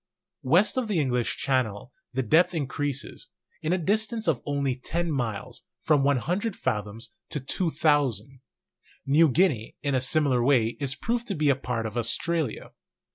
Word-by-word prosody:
West 175 - +3
of 255 -3 0
the 200 -6 0
English 125 -5 0
Channel 125 -3 -1 0.2
the 130 +1 -1
depth 165 +9 +3
increases, 145 -2 -3 0.3
in 155 - -1
a 185 - +3
distance 215 +5 0
of 155 -7 +1
only 140 -2 0
ten 170 +6 -3
miles, 120 -7 -3 0.2
from 150 -3 +2
100 175 - 0
fathoms 110 - -3 0.2
to 150 - -2
2,000. 135 - 0 0.6
New 150 +3 +5
Guinea 140 - +1
in 140 - 0
a 130 - +2
similar 130 -2 +2
way 120 -4 +3
is 140 -1 -1
proved 240 - -2
to 200 - -2
be 150 -2 +2
a - - +2
part 125 -3 -3
of 110 +2 -5
Australia. 140 +4 -1
140 Hz, 155 wpm, -26 LUFS, 125-165 Hz, 0.6 s, New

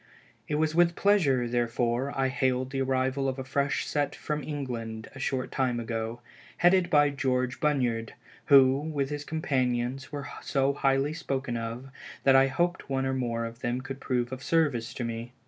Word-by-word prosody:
It 150 - -1
was 155 +1 +1
with 170 0 +4
pleasure, 145 -12 +3
therefore, 120 +2 0
I 135 0 +2
hailed 130 0 0
the 135 -1 -1
arrival 130 +1 0
of 130 - -4
a 130 - -4
fresh 140 +2 0
set 145 -2 -1
from 150 -1 -3
England 115 -7 -5
a 135 - -10
short 130 -1 -2
time 125 -3 0
ago, 115 0 -4 0.4
headed 180 0 +4
by 145 -1 +4
George 130 -2 -1
Bunyard, 125 -7 0 0.3
who, 135 -1 +7
with 145 -2 -2
his 145 0 -3
companions 130 -4 -1
were 145 -1 -5
so 135 0 +1
highly 135 +1 +1
spoken 135 -5 -3
of, 115 +3 -5 0.3
that 135 -1 +5
I 135 0 +6
hoped 175 +7 -1
one 135 -1 0
or 130 - 0
more 120 -3 -1
of 115 0 -8
them 120 0 -1
would 135 0 -6
prove 125 -2 -1
of 130 0 -6
service 145 -8 +1
to 125 - -3
me. 115 +1 -5
135 Hz, 180 wpm, -28 LUFS, 120-145 Hz, 0.4 s, who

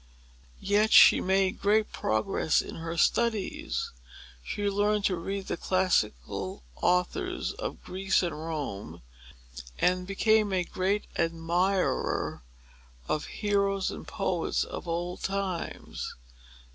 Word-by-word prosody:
Yet 210 +2 +2
she - - +8
made 190 0 +1
great 210 +2 +2
progress 110 +8 +1
in - - -5
her 165 +1 -5
studies. 225 0 0 0.5
She 205 - -2
learned 205 +1 +1
to 185 - +2
read 195 +3 -4
the - - -3
classical 100 - 0 0.2
authors 180 +1 0
of - - -6
Greece 190 +1 +1
and 175 - -1
Rome, 145 - -5 0.7
and 180 0 +1
became 215 +1 +3
a 185 -1 +2
great 190 +4 -1
admirer 170 - 0 0.7
of 150 - -1
the - - -10
heroes 200 -2 0
and - - -8
poets 185 -4 -1
of - - -7
old 175 +1 -3
times. 195 -3 -3
185 Hz, 115 wpm, -28 LUFS, 165-200 Hz, 0.7 s, she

